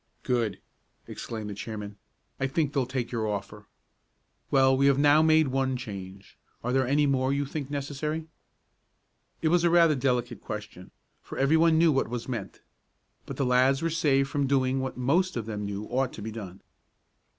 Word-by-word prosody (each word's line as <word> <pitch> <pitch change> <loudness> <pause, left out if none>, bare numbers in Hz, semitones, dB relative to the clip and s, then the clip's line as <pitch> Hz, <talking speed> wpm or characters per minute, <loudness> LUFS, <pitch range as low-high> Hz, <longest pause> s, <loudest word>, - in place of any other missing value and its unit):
"Good!" 115 -6 0 0.5
exclaimed 110 -3 -6
the - - -4
chairman. 105 0 -6 0.4
"I 135 - +1
think 145 +1 -1
they'll 135 -4 0
take 130 -2 -3
your 115 -3 -1
offer. 105 0 -5 0.8
Well, 135 -1 +4
we 140 +1 +3
have 140 -1 +4
now 145 +2 +5
made 160 -2 +4
one 130 0 0
change. 100 -5 -9 0.2
Are 125 +2 -1
there 130 -1 +2
any 145 +3 +3
more 130 -2 +1
that 140 - +1
you 140 0 -1
think 140 0 -5
necessary?" 145 +2 -3 1.2
It 160 - +3
was 175 +1 +3
rather 170 -2 +5
a - - -1
delicate 125 -2 -1
question, 105 -3 -7 0.3
for - - -9
everyone 160 +4 +4
knew 165 0 +5
what 135 -5 0
was 120 -1 -5
meant. 115 -7 -5 0.7
But - - -6
the 135 - 0
lads 130 +3 +3
were 165 - 0
saved 140 -4 +2
from 140 0 -1
doing 130 -1 +1
what 130 -1 -4
most 155 +7 +1
of 115 - -3
them 105 -2 -4
knew 100 0 -4
ought 130 +3 -1
to 105 - -8
be 110 - -5
done. 100 -4 -9
130 Hz, 185 wpm, -27 LUFS, 115-145 Hz, 1.2 s, now